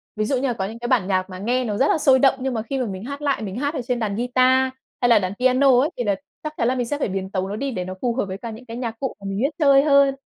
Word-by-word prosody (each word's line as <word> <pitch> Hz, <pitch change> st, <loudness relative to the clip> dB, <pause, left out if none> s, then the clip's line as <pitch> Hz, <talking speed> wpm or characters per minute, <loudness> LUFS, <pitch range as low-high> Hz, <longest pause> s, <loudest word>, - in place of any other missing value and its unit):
Ví 215 Hz, 0 st, -1 dB
dụ 265 Hz, -, 0 dB
như 265 Hz, +2 st, 0 dB
là 245 Hz, -, 0 dB
có 195 Hz, -4 st, -3 dB
những 225 Hz, +4 st, -7 dB
cái 240 Hz, -, -4 dB
bản 235 Hz, -8 st, +2 dB
nhạc 185 Hz, -1 st, 0 dB
mà 185 Hz, -1 st, -8 dB
nghe 245 Hz, +6 st, 0 dB
nó 210 Hz, -3 st, -2 dB
rất 275 Hz, -, +3 dB
là -, -, +3 dB
sôi 265 Hz, -3 st, +4 dB
động, 270 Hz, 0 st, +4 dB
nhưng 260 Hz, 0 st, -2 dB
mà 220 Hz, -, -1 dB
khi 265 Hz, +5 st, -4 dB
mà 255 Hz, -, 0 dB
mình 190 Hz, -2 st, -6 dB
hát 280 Hz, +4 st, -6 dB
lại, 280 Hz, -4 st, 0 dB
mình 200 Hz, -3 st, -5 dB
hát 285 Hz, +4 st, -1 dB
ở 265 Hz, -, -3 dB
trên 245 Hz, 0 st, -2 dB
đàn 210 Hz, -3 st, -2 dB
guitar 255 Hz, +2 st, +3 dB, 0.3 s
hay 245 Hz, -, +3 dB
là 230 Hz, -2 st, +6 dB
đàn 185 Hz, -1 st, -3 dB
piano 255 Hz, 0 st, +4 dB
ấy, 285 Hz, +4 st, +2 dB
thì 245 Hz, -, -1 dB
là 205 Hz, -3 st, +1 dB, 0.3 s
chắc 305 Hz, 0 st, -4 dB
chắn 230 Hz, -, +1 dB
là 255 Hz, -, +1 dB
mình 245 Hz, -2 st, -1 dB
sẽ 290 Hz, -, -2 dB
phải -, -, 0 dB
biến 190 Hz, 0 st, -3 dB
tấu 190 Hz, -1 st, -2 dB
nó 205 Hz, -, -3 dB
đi 275 Hz, +5 st, -3 dB
để 180 Hz, -6 st, -4 dB
nó 185 Hz, -, -5 dB
phù 240 Hz, -2 st, 0 dB
hợp 265 Hz, -, 0 dB
với 190 Hz, 0 st, -6 dB
cả 230 Hz, +2 st, -7 dB
những 225 Hz, +3 st, -11 dB
cái 230 Hz, -1 st, -7 dB
nhạc 230 Hz, -2 st, -4 dB
cụ 265 Hz, -, -2 dB
mà 200 Hz, -, -12 dB
mình 195 Hz, -, -3 dB
biết 275 Hz, +5 st, +2 dB
chơi 280 Hz, -3 st, +5 dB
hơn. 280 Hz, -2 st, +4 dB
245 Hz, 355 wpm, -22 LUFS, 210-265 Hz, 0.3 s, là